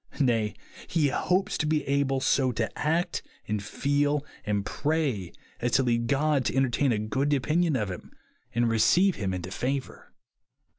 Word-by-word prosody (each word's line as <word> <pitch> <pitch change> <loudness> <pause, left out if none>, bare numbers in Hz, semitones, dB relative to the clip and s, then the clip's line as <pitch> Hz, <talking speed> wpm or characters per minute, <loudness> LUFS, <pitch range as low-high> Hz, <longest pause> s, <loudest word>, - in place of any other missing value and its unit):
Nay, 115 -6 +1 0.3
he 155 -4 +2
hopes 185 +7 0
to 150 - 0
be 155 -1 +1
able 135 -1 +1
so 130 -1 +2
to 115 0 -2
act, 165 +4 0 0.3
and 105 -1 -1
feel, 145 +4 0 0.2
and 100 -1 0
pray, 140 - -1 0.3
as 120 0 -1
to 135 - +4
lead 120 -1 +1
God 140 +1 +2
to - - -1
entertain 135 0 +2
a 110 - +1
good 130 +7 -1
opinion 155 +3 +1
of 105 -6 -1
him, 90 - -9 0.4
and 120 0 +1
receive 175 - +3
him 95 -3 -2
into 90 0 -5
favour. 135 +5 -4
135 Hz, 160 wpm, -27 LUFS, 115-150 Hz, 0.4 s, to